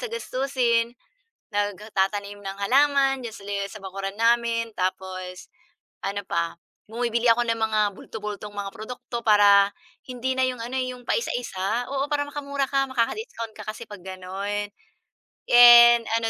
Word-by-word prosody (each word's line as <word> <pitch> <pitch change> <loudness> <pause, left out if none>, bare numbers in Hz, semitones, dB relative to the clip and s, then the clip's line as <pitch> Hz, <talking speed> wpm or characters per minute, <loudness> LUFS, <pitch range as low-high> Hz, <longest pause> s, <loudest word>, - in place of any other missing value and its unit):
sa - - -3
gastusin, 255 - 0 0.6
nagtatanim 205 0 -2
ng 195 0 -6
halaman 270 +2 +3
diyan 225 - -8 0.4
sa 215 - -9
bakuran 195 +1 -5
namin 230 0 +2
tapos, 185 0 -4 0.6
ano 200 +1 -2
pa, 170 -2 -1 0.3
bumibili 235 +1 -1
ako 240 +1 +4
ng 230 0 +1
mga 220 -1 +1 0.2
bulto-bultong 210 0 -7
mga 200 -1 -4
produkto 240 +2 -7
para 205 -2 +6 0.4
hindi 255 +1 -2
na 260 - +4
yung 250 -2 -5
ano, 245 +3 -5
yung 255 -1 -4
paisa-isa 235 - -2
oo 275 +1 0
para 290 -1 +1
makamura 280 -1 -3
ka, 275 -1 +2
maka-discount 240 - -2
ka - - -9
kasi 215 +2 -6
pag 205 -3 -10
ganun. 195 +2 -4 0.8
And 240 -1 +9 0.2
ano 225 0 -1
230 Hz, 135 wpm, -24 LUFS, 200-250 Hz, 0.8 s, And